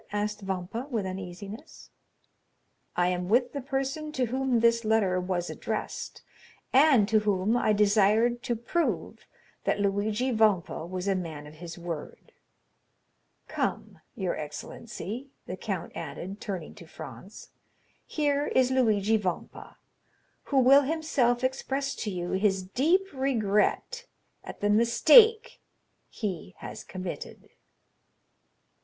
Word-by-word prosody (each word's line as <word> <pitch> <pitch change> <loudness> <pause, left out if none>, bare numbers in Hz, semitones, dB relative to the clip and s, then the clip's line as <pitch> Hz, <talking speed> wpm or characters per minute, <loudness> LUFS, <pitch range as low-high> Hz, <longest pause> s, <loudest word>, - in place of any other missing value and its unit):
asked 210 +1 -2
Vampa 190 +6 -4
with 225 -7 -1
uneasiness. 190 +3 -8 1.0
"I 175 0 +2
am 180 0 -2
with 245 +3 +3
the 280 - -3
person 270 +4 -3
to 260 -3 +1
whom 255 0 0
this 230 0 +3
letter 215 -4 +2
was 180 -1 -2
addressed, - - -5 0.5
and 265 -6 +6
to 220 0 +4
whom 205 +1 +1
I 230 -3 +2
desired 210 +3 +3
to 240 - 0
prove 320 +9 -2 0.4
that - - +1
Luigi 205 +5 0
Vampa 205 -7 +1
was 185 +1 -4
a 195 - +3
man 165 -5 -5
of 150 - -11
his 165 +2 -9
word. 170 -3 -7 1.2
Come, - - -3 0.2
your 190 -6 -2
excellency," 210 - -7 0.2
the - - -5
count - - -4
added, 195 +3 -6
turning 185 -6 -5
to - - -12
Franz, - - -11 0.6
"here 290 -1 0
is 260 0 +2
Luigi 220 -4 +3
Vampa, 185 -5 -5 0.7
who 280 - -1
will 265 +2 +7
himself 275 -5 +1
express 270 +1 -1
to 215 - -3
you 175 -2 -4
his 190 -1 +1
deep 300 - +2
regret 265 - 0 0.4
at - - -9
the 205 - +2
mistake 430 - +6 0.5
he 185 -4 -5
has - - -8
committed." 185 -2 -7
215 Hz, 125 wpm, -28 LUFS, 190-260 Hz, 1.2 s, will